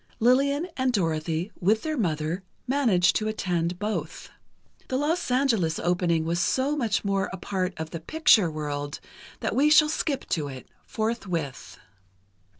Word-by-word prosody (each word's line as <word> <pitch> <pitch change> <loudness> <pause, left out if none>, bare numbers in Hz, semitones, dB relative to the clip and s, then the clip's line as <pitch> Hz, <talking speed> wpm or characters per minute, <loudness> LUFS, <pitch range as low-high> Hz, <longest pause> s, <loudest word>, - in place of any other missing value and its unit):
Lillian 280 +7 +3
and 260 -1 +1
Dorothy, 165 -2 -1
with 215 +5 +2
their 310 -1 -2
mother, 165 - -1 0.2
managed 245 -10 +3
to 215 - -2
attend 175 -5 -1
both. 180 -6 -4 0.6
The 255 - -1
Los 310 +4 0
Angeles 230 -11 +2
opening 175 -2 +1
was 170 +1 0
so 265 +10 +1
much 230 -8 0
more 195 -1 0
a 190 - -5
part 185 -1 -3
of 160 0 -5
the 165 - -5
"picture" 215 - +4
world 145 -1 -4 0.4
that - - -1
we 290 +3 +4
shall 305 0 +6
skip 300 -3 -2
to 150 -4 -1
it, 130 -2 -9 0.2
forthwith. 185 - -3
195 Hz, 150 wpm, -26 LUFS, 165-255 Hz, 0.6 s, shall